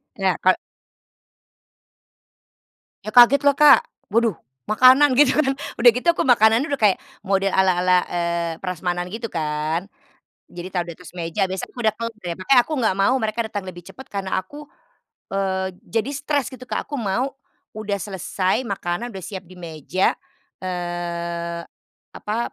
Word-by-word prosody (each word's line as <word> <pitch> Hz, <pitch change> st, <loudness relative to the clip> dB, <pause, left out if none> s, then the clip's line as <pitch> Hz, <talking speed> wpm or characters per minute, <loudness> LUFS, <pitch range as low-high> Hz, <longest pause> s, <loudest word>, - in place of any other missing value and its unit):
Ya 190 Hz, -5 st, 0 dB
kalo 185 Hz, 0 st, +4 dB, 2.4 s
Ya 215 Hz, -, -7 dB
kaget, 250 Hz, +3 st, +8 dB
lah 280 Hz, -, +5 dB
Kak, 300 Hz, 0 st, +8 dB, 0.3 s
waduh 230 Hz, -3 st, +2 dB, 0.3 s
makanan 255 Hz, +5 st, +6 dB
gitu 290 Hz, -3 st, +6 dB
kan. 270 Hz, -2 st, +2 dB, 0.2 s
Udah 240 Hz, +1 st, +8 dB
gitu 250 Hz, -, -3 dB
aku -, -, -2 dB
makanannya 230 Hz, +3 st, +4 dB
udah 280 Hz, -, -1 dB
kayak 205 Hz, -3 st, +4 dB, 0.3 s
model 195 Hz, 0 st, +1 dB
ala-ala, 180 Hz, -1 st, +3 dB
eee, 170 Hz, -1 st, -2 dB
prasmanan 180 Hz, -1 st, -3 dB
gitu 225 Hz, +4 st, -5 dB
kan. 155 Hz, +3 st, -2 dB, 0.6 s
Jadi 175 Hz, +1 st, -7 dB
taruh 175 Hz, -1 st, -1 dB
di -, -, -6 dB
atas 180 Hz, 0 st, -13 dB
meja, 175 Hz, +3 st, -1 dB
biasanya 190 Hz, 0 st, -5 dB
aku -, -, -12 dB
udah 220 Hz, -3 st, +2 dB
tahu 230 Hz, +1 st, -3 dB
tuh, 185 Hz, -6 st, -6 dB
makanya 245 Hz, +7 st, +4 dB
aku 310 Hz, -, -5 dB
nggak 220 Hz, -8 st, +1 dB
mau 225 Hz, +7 st, +4 dB
mereka 220 Hz, +1 st, -2 dB
datang 205 Hz, -3 st, -5 dB
lebih 175 Hz, -2 st, -10 dB
cepat, 265 Hz, -, -11 dB
karena 195 Hz, -1 st, -3 dB
aku, 290 Hz, +11 st, -12 dB, 0.7 s
eee, 190 Hz, -1 st, -1 dB
jadi 225 Hz, +4 st, -2 dB
stres 290 Hz, -2 st, -1 dB
gitu, 255 Hz, -, -11 dB
Kak, -, -, -3 dB
aku 295 Hz, -, -7 dB
mau 235 Hz, +6 st, -1 dB, 0.4 s
udah 210 Hz, -2 st, -3 dB
selesai 190 Hz, +3 st, -2 dB
makanan, 195 Hz, +3 st, -3 dB
udah 190 Hz, -5 st, -8 dB
siap 190 Hz, 0 st, -6 dB
di 185 Hz, -, -14 dB
meja. 170 Hz, +2 st, -1 dB, 0.5 s
Eee, 170 Hz, -1 st, -4 dB, 0.5 s
apa, 220 Hz, +3 st, -3 dB
195 Hz, 155 wpm, -22 LUFS, 175-235 Hz, 2.4 s, kaget